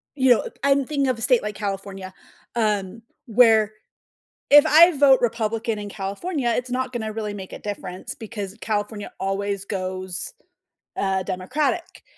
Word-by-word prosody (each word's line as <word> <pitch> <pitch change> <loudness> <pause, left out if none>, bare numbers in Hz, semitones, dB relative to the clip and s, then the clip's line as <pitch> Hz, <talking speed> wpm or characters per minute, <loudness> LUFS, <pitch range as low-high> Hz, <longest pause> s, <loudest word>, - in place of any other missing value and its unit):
you 260 -2 +4
know, 240 - +4 0.2
I'm 280 -1 +3
thinking 280 -2 0
of 255 -3 0
a - - -9
state 250 -3 +4
like 210 -1 -4
California, 195 -2 -5 0.4
um, 210 -1 -1 0.2
where 220 -2 +5 0.8
if 290 +1 +8
I 335 +2 +7
vote 270 -2 +6
Republican 225 -1 -1
in 205 0 -6
California, 240 - -3
it's 250 0 -2
not 255 0 -2
gonna 220 -2 -3
really 210 -1 -4
make 190 -2 -8
a - - -7
difference 190 -3 -6
because 210 -3 -7
California 210 -1 -3
always 200 0 -2
goes, 185 -2 -4 0.7
uh, 190 -1 0
Democratic, 285 - -2
215 Hz, 150 wpm, -23 LUFS, 195-250 Hz, 0.8 s, if